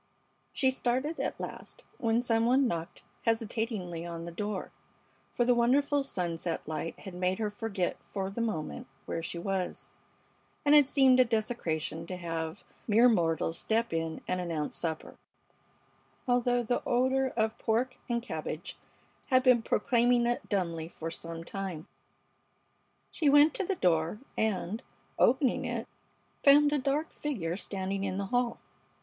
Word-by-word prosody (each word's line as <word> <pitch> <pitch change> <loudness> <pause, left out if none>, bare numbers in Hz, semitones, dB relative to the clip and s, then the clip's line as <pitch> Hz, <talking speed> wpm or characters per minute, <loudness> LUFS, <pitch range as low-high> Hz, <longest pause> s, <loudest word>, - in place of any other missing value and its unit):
She 265 -2 +2
started 260 +5 -1
at - - -2
last - - -8 0.2
when 230 +1 +2
some 230 -1 +2
one 260 +2 +4
knocked 165 -6 -4 0.2
hesitatingly 220 -6 -1
on 170 -1 -6
the 170 - -6
door, 205 +2 -4 0.6
for 240 - +2
the 245 - +5
wonderful 280 +4 +3
sunset 175 - -3
light 155 +1 -4
had 190 - -8
made 180 +1 0
her 215 -2 -1
forget 205 -5 -2
for 195 -1 -4
the 235 - -3
moment 215 -10 -3 0.2
where 165 - -3
she 170 - -5
was, 185 +1 -3 0.8
and 290 - +5
it 290 -3 +7
seemed 265 -3 +5
a - - +9
desecration 175 -9 -2
to 185 - -5
have 165 -2 -4 0.2
mere 230 +3 +6
mortals 165 -6 +1
step 225 -2 0
in 165 -1 -2
and 185 0 -1
announce 165 -4 -2
supper, 160 -2 -3 1.1
although 245 0 +2
the 245 +2 0
odor 260 +2 +2
of 220 0 0
pork 245 +3 0
and 235 -1 0
cabbage 160 -3 -5 0.5
had 255 -1 +4
been 250 -3 +5
proclaiming 240 +2 +2
it 240 0 -1
dumbly 170 -5 -1
for 165 -1 -6
some 165 0 -6
time. 185 -4 -5 1.3
She 305 -4 +2
went 290 +2 +6
to 415 - -1
the 390 +1 -1
door, 165 - +1 0.2
and, 215 0 -1 0.4
opening 260 0 +3
it, - - -3 0.6
found 290 +1 +7
a 295 - +2
dark 285 +4 -1
figure 190 - -3
standing 195 0 -3
in 190 -1 -2
the 200 - -1
hall. 245 -1 +1
220 Hz, 150 wpm, -30 LUFS, 170-245 Hz, 1.3 s, a